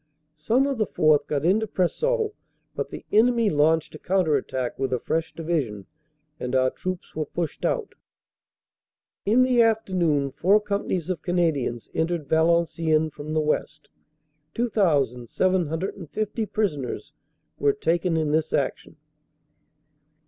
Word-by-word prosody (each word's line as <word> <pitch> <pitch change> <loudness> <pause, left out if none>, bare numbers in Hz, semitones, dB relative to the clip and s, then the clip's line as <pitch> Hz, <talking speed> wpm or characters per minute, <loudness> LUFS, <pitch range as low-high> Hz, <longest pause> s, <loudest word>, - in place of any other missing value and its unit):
Some 220 - +1
of 275 -4 -2
the 215 - +1
4th. 155 -3 +3
got 145 0 -1
into 215 +5 +3
Preseau, 440 - 0 0.4
but - - -3
the - - -9
enemy 230 0 +4
launched 155 +1 +2
a - - -9
counter 180 -5 +1
attack 130 -2 -3
with 135 -1 -1
a 125 - 0
fresh 160 +5 -2
Division 150 - -2 0.5
and 125 +1 -3
our 130 0 +3
troops 185 -1 -6
were 155 -1 -2
pushed 170 -3 -4
out. 465 -4 -1 1.3
"In 235 +5 +5
the 250 -2 +4
afternoon 180 -11 +1
four 195 +9 +3
companies 200 -4 -2
of 170 -4 -4
Canadians 160 -10 -1
entered 160 -2 -1
Valenciennes 160 -1 +2
from 150 +1 -6
the 155 - +2
west. 155 0 -2 0.7
2,750 185 - 0
prisoners 155 - -2 0.5
were 425 - +4
taken 175 - 0
in 155 -2 0
this 155 +1 0
action." - - -2
165 Hz, 125 wpm, -25 LUFS, 150-205 Hz, 1.3 s, In